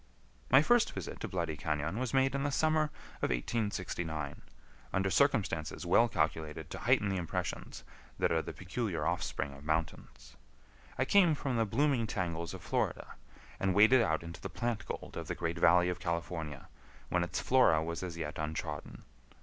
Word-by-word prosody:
My 130 +3 +7
first 240 +5 +3
visit 95 -5 -6
to - - -4
Bloody 85 -4 -2
Cañon 75 +6 -2
was 130 -2 -2
made 135 0 +3
in 140 - -1
the 145 - 0
summer 155 +2 +2 0.4
of - - +1
1869, 80 - -2 0.5
under 95 0 0
circumstances 95 - +1
well 105 +7 +5
calculated 80 -2 -2
to - - -5
heighten 120 -4 +3
the 95 - 0
impressions 85 -2 -4 0.3
that - - +1
are 80 -1 +2
the - - -6
peculiar 90 -4 -3
offspring 80 -4 -2
of 70 +1 -13
mountains. 80 -5 -3 0.6
I 130 - +2
came 175 -1 +5
from 135 -3 -2
the 115 -1 +2
blooming 125 +1 +2
tangles 85 -5 -3
of - - -10
Florida, - - -2 0.5
and 95 -2 +1
waded 110 +5 +7
out 80 -7 +1
into 85 +1 -8
the - - -5
plant 120 -2 -3
gold - - -6
of - - -5
the - - -2
great 85 +1 -2
valley 90 +2 +5
of 90 - -3
California, 80 -3 -4 0.4
when 90 0 +2
its 85 - -2
flora 125 -12 +4
was 85 +1 -4
as 90 -2 -5
yet 75 -2 -4
untrodden. 75 -1 -4
90 Hz, 175 wpm, -32 LUFS, 80-120 Hz, 0.6 s, My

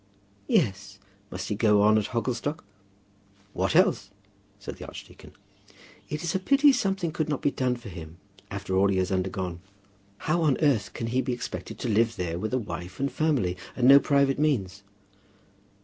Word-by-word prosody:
"Yes; 100 - 0 0.3
must - - -6
he 105 - -1
go 105 -1 +4
on 110 +1 +5
at 110 -2 +1
Hogglestock?" 125 +5 -3 0.9
"What 95 - -1
else?" 165 - +3 0.5
said 100 - -8
the - - -9
archdeacon. - - -12 0.8
"It 150 +2 -4
is 170 - -1
a 190 - +1
pity 275 +8 +5
something 195 -9 -1
could 155 0 -2
not 145 - -2
be 145 - +2
done 125 -2 0
for 120 -3 -10
him 85 -2 -10 0.3
after 95 -1 -4
all 95 +1 +4
he 100 -1 +1
has 95 +1 0
undergone. 95 -2 -2 0.6
How 170 +2 +1
on 150 -5 +2
earth 135 - +1
can 115 - -4
he 125 +3 0
be 130 0 -2
expected 120 - -6
to - - -4
live 115 +1 +2
there 85 -3 -3
with 110 +3 -3
a 130 - +1
wife 90 -5 -6
and 140 +1 -1
family, 135 - 0 0.2
and 125 -1 +2
no 140 +1 +9
private 140 -1 +2
means?" 105 -11 0
115 Hz, 180 wpm, -26 LUFS, 95-145 Hz, 0.9 s, no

